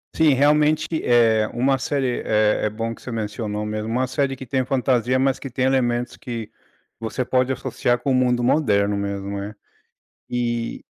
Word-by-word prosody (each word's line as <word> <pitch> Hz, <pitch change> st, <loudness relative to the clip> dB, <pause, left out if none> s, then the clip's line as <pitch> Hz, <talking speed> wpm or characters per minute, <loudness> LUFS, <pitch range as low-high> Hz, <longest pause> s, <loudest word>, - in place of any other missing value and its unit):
Sim, 160 Hz, -3 st, +4 dB
realmente, 150 Hz, +3 st, +3 dB, 0.2 s
eh, 115 Hz, -3 st, +4 dB
uma 135 Hz, +3 st, +2 dB
série 130 Hz, -1 st, -1 dB
é 105 Hz, 0 st, +2 dB
é -, -, +1 dB
bom 115 Hz, +2 st, -4 dB
que -, -, -19 dB
você 125 Hz, -, -7 dB
mencionou 105 Hz, -1 st, -3 dB
mesmo. 105 Hz, +1 st, -3 dB
Uma 130 Hz, +2 st, 0 dB
série 135 Hz, +1 st, -1 dB
que 130 Hz, -, -9 dB
tenha 130 Hz, +1 st, -1 dB
fantasia, 130 Hz, -1 st, +1 dB
mas 135 Hz, -1 st, +2 dB
que 135 Hz, -, -7 dB
tem 130 Hz, +1 st, -1 dB
elementos 125 Hz, -2 st, 0 dB
que 115 Hz, -3 st, -6 dB, 0.5 s
você 115 Hz, +3 st, -2 dB
pode 130 Hz, +1 st, +1 dB
associar 120 Hz, -2 st, -1 dB
com 135 Hz, -, -1 dB
o -, -, +3 dB
mundo 125 Hz, -1 st, +2 dB
moderno 105 Hz, -7 st, +2 dB
mesmo, 100 Hz, 0 st, -3 dB
né. 100 Hz, +2 st, -6 dB, 0.8 s
E 120 Hz, -1 st, -2 dB
120 Hz, 175 wpm, -22 LUFS, 110-130 Hz, 0.8 s, Sim